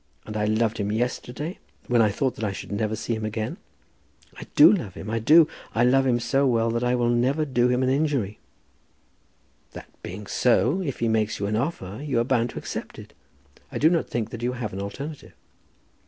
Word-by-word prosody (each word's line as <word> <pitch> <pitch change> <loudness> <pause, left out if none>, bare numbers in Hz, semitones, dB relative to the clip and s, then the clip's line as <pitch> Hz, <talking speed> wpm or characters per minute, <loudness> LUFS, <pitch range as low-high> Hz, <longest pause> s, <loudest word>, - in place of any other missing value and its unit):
And 105 - -7
I 105 -1 0
loved 110 +1 +1
him 100 0 -1
yesterday, 125 - -3 0.3
when 120 -1 +3
I 110 - +4
thought 130 +6 -1
that - - -7
I 105 - 0
should 95 - -8
never 105 +1 -1
see 115 - -3
him 110 -1 -3
again. 110 - -3 0.8
I - - -9
do 300 -6 +9
love 110 - -3
him. 105 - -6
I 115 - 0
do. 155 +8 +6 0.3
I 115 - +3
love 135 +2 +4
him 120 -1 +2
so 135 +4 +1
well 115 -2 +2
that 115 +1 -1
I 125 0 +2
will 120 -1 +1
never 130 +6 +1
do 125 -3 +2
him 125 +1 +1
an 130 - +2
injury." 135 -7 0 1.3
"That - - -9 0.2
being 95 +4 -7
so, 125 - +2
if 140 -10 -4
he 115 - +2
makes 110 -1 +1
you 100 - -2
an 105 +1 -1
offer 110 - -3
you 140 -5 0
are - - +3
bound 120 -1 +1
to - - -9
accept - - -6
it. - - -12 0.6
I - - -4
do 160 +3 +4
not 170 - 0
think 115 -2 -3
that 120 - -7
you 125 +1 -1
have 120 -5 -5
an 95 - -4
alternative." 140 +9 -7
120 Hz, 215 wpm, -25 LUFS, 110-135 Hz, 1.3 s, do